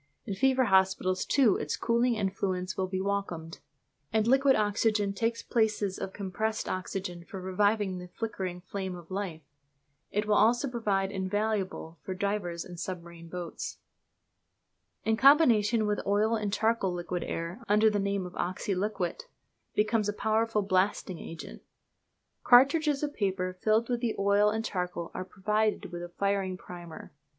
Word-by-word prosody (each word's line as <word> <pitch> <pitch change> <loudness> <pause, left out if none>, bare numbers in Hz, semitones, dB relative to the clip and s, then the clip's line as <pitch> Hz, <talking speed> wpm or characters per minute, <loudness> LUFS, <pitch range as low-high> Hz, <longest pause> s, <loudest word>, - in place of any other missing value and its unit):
In 200 - -3
fever 260 +6 +3
hospitals, 190 -3 +2
too, 255 -9 +4
its 150 - -3
cooling 235 +1 +2
influence 190 -2 -2
will 190 - -1
be 185 0 -2
welcomed; 190 -5 -3 0.5
and 220 -1 +2
liquid 270 +2 +5
oxygen 210 -1 +1
takes 230 +3 -1
the - - -34
places 215 -4 +1
of 190 - -4
compressed 210 +3 -3
oxygen 185 -2 -4
for 190 +2 -8
reviving 190 +1 +1
the 180 - -8
flickering 190 -3 -4
flame 190 0 -5
of 175 0 -12
life. 185 -5 -4 0.7
It 210 +1 -1
will 210 - +2
also 240 +6 +4
prove 235 -3 -6 0.2
invaluable 190 -3 -2
for 185 - -5
divers 185 -4 -2
and 175 -2 -9
submarine 170 -2 -7
boats. 175 0 -5 1.3
In 220 0 +2
combination 235 -6 +5
with 210 0 -1
oil 210 +3 +2
and 210 -2 -2
charcoal 220 -3 +1
liquid 175 0 -3
air, 170 +7 -4
under 215 +1 +5
the 205 - 0
name 200 -1 -1
of 180 - -8
"oxyliquit," 185 0 -2 0.5
becomes 215 0 +2
a - - -1
powerful 220 0 +1
blasting 185 -2 0
agent. 165 -1 -9 0.8
Cartridges 280 +4 +5
of 290 -1 -1
paper 185 -3 -1
filled 215 +5 +1
with 245 -1 0
the 235 -3 0
oil 200 +1 +4
and 220 +1 -2
charcoal 180 -4 -3
are - - -4
provided 210 +1 -1
with 175 0 -5
a 175 - -6
firing 195 0 -1
primer. 175 -3 -10
200 Hz, 150 wpm, -29 LUFS, 185-220 Hz, 1.3 s, liquid